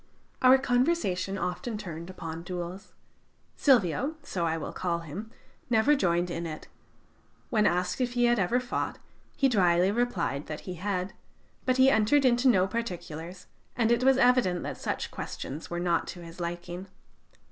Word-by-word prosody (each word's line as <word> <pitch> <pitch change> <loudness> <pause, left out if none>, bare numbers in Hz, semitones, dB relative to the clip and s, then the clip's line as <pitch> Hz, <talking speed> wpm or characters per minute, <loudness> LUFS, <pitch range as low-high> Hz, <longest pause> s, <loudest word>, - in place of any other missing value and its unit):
Our 255 +1 +7
conversation 245 - 0
often 190 +6 -3
turned 170 -4 -7
upon 165 -3 -6
duels. 180 +2 -6 0.6
Silvio 260 - +3
so 175 -11 -2
I 160 0 0
will 160 - -5
call 170 -2 -2
him 175 +8 -7 0.4
never 240 +6 +4
joined 175 -6 +1
in 170 0 -3
it. 155 -1 -7 0.8
When 215 -2 +4
asked 180 +7 0
if 245 -1 0
he 245 0 +3
had 240 -1 +3
ever 195 +7 +2
fought, 250 0 -3 0.4
he 275 - +4
dryly 185 -5 +3
replied 200 -11 -1
that 150 - -6
he 185 - -6
had; 185 +1 -3 0.5
but 255 0 +2
he 260 +1 +6
entered 265 +6 +3
into 245 +1 +4
no 190 -7 +5
particulars, 180 -5 -5 0.3
and 230 -1 +2
it 235 +1 +2
was 265 0 +5
evident 245 -9 +3
that - - -5
such - - -3
questions 150 +4 -6
were 175 - -3
not 175 -1 +1
to 175 - -7
his 165 +1 -11
liking. 175 +2 -5
185 Hz, 160 wpm, -28 LUFS, 175-245 Hz, 0.8 s, Our